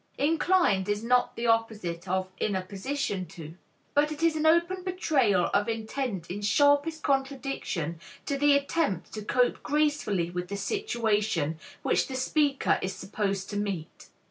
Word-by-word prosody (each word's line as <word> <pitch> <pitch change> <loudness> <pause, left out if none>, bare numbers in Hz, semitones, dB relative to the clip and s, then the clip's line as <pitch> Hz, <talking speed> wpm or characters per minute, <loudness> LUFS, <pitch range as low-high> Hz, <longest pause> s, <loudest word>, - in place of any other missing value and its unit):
"Inclined" 300 - +2
is 205 +1 -1
not 245 +1 +2
the 235 - -3
opposite 215 -7 0
of 185 0 -1
"in 205 - 0
a 185 - -1
position 200 0 -3
to," 160 -1 -10 0.4
but 295 +1 +3
it 305 +1 -5
is 330 -1 +3
an 310 0 +1
open 340 +3 +3
betrayal 275 - +2
of 205 +2 +2
intent 225 -5 -3
in 200 +3 -4
sharpest 285 +8 +3
contradiction 270 - -2 0.3
to 280 - -1
the 290 +1 +4
attempt 280 - -1
to 215 - -5
cope 245 +4 +1
gracefully 290 - 0
with 180 0 -4
the 200 +2 -4
situation 210 - 0 0.2
which - - +2
the 265 - -5
speaker 280 +2 +1
is 185 0 -3
supposed 195 -1 -2
to 205 - -3
meet. 195 -6 -4
225 Hz, 155 wpm, -28 LUFS, 190-290 Hz, 0.4 s, the